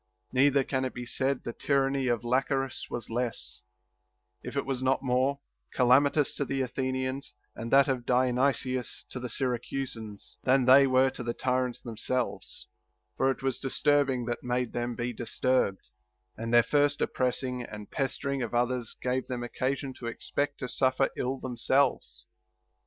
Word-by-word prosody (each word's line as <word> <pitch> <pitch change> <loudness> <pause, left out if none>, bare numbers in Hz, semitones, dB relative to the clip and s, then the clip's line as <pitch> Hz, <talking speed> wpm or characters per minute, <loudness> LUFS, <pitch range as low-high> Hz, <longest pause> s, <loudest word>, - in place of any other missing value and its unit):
Neither 140 +1 +4
can 130 0 -1
it 130 - -3
be 125 - -5
said 135 +2 -1
that 120 - -6
the - - -13
tyranny 135 -1 +2
of 120 -1 0
Lachares 135 +2 0
was 115 -2 -5
less, 120 0 -2 0.8
if - - -6
it - - 0
waa 135 -2 -2
not 130 +1 +1
more, 130 +2 +2 0.4
calamitous 140 +3 +4
to - - +1
the 135 0 -2
Athenians, 130 0 -2 0.2
and 115 - -5
that 135 0 +6
of 130 -3 -1
Diony 125 +2 +3
sius 130 -2 -4
to 130 - -5
the 125 0 -5
Syracusans, 120 -3 -4
than 130 0 +4
they 135 +2 +8
were 130 0 +4
to 130 - -8
the 120 -1 -3
tyrants 125 -1 -1
them 115 -3 -8
selves; 125 +2 -3 0.5
for 135 - +2
it 135 - -2
was 135 -2 0
disturbing 135 -2 +2
that 120 0 -3
made 125 -1 -1
them 120 0 -2
be 120 +1 -3
disturbed; 120 -3 0 0.5
and 115 +1 -4
their 120 0 +7
first 145 +1 +2
oppressing 125 0 -1
and 105 -3 -9
pestering 140 0 -1
of 120 -1 -3
others 120 -1 0
gave 125 +1 0
them 125 -2 -3
occasion 130 +2 -2
to 120 - -5
expect 145 +4 -2
to 125 - -2
suffer 130 +1 +2
ill 130 +2 -2
themselves. 130 +2 0
130 Hz, 165 wpm, -29 LUFS, 120-135 Hz, 0.8 s, they